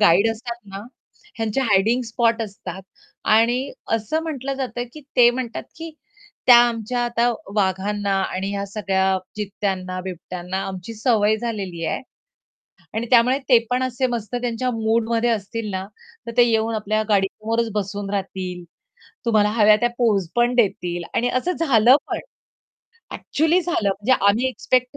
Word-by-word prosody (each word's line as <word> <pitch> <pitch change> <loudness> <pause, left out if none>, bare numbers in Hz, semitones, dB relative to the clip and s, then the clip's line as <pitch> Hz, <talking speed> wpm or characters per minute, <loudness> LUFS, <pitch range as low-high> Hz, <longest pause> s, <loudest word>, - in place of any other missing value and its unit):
Guide 200 +2 +5
असतात 235 +1 -5 0.2
ना - - -4 0.6
ह्यांचे 225 +3 -1
हायडिंग 225 +1 +2
स्पॉट 230 0 +1
असतात 190 -3 -7 0.5
आणि 240 +5 +2 0.2
असं 270 +9 -2
म्हटलं 275 -4 -4
जातं 255 -2 -3
की 305 - -10 0.2
ते 240 -1 +8
म्हणतात, 245 -1 -4
की 330 +1 -7 0.6
त्या 245 -1 +10
आमच्या 235 +1 -3
आता 240 0 +1 0.3
वाघांना 200 +1 0
आणि 190 +1 -3
ह्या 200 0 -2
सगळ्या 190 -2 0 0.2
चित्त्यांना, 190 -3 -3
बिबट्यांना 180 0 -5
आमची 190 +3 -7
सवय 220 -2 +2
झालेली 200 -7 -4
आहे - - -2 0.9
आणि 225 +2 -2
त्यामुळे 250 +1 +5
ते 245 - +8
पण 250 +1 +1
असे 255 0 0
मस्त 235 -2 -4
त्यांच्या 245 +1 -1
मूडमध्ये 225 +1 +1
असतील 220 0 -2
ना, 190 0 -3 0.4
तर 235 - -3
ते 245 - +8
येऊन 225 0 +1
आपल्या 215 0 0
गाडी 195 -2 +3
समोरच 225 +1 -2
बसून 200 -1 -3
राहतील. 185 -3 -4 0.6
तुम्हाला 215 -3 +3
हव्या 215 -1 +5
त्या 240 +2 +1
पोज 210 -7 +2
पण 240 +1 +3
देतील 180 -6 0
आणि 245 +1 +1
असं 255 +9 0
झालं 255 -5 +5
पण. - - -2 0.9
अ‍ॅक्चुअली 320 +4 +1
झालं 345 - 0
म्हणजे 205 +6 0 0.2
आम्ही 225 +6 +2
एक्स्पेक्ट 255 +1 0
225 Hz, 145 wpm, -22 LUFS, 200-245 Hz, 0.9 s, त्या